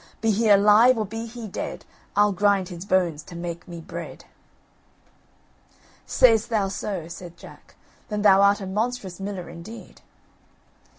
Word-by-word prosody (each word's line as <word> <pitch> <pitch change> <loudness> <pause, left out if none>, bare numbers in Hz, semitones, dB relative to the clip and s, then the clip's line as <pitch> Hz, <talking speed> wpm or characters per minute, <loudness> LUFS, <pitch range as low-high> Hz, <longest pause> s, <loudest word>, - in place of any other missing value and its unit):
Be 225 - +1
he 215 +2 +1
alive 210 +5 +6
or 215 - -1
be 225 +3 -6
he 230 -1 -8
dead, 190 - -6 0.3
I'll 205 0 +4
grind 195 -1 +1
his 175 0 -8
bones 180 -6 +1
to 170 +3 -12
make 170 0 -6
me 170 -1 -8
bread!" 165 - -9 1.8
"Say'st 230 -2 +4
thou 210 -4 0
so," 190 -3 -4
said 170 0 -10
Jack; - - -15 0.3
"then 210 -1 -2
thou 195 -1 +6
art 200 +1 +4
a - - -5
monstrous 210 -1 -3
miller 195 -2 -5
indeed." 170 +7 -11
200 Hz, 145 wpm, -24 LUFS, 180-220 Hz, 1.8 s, alive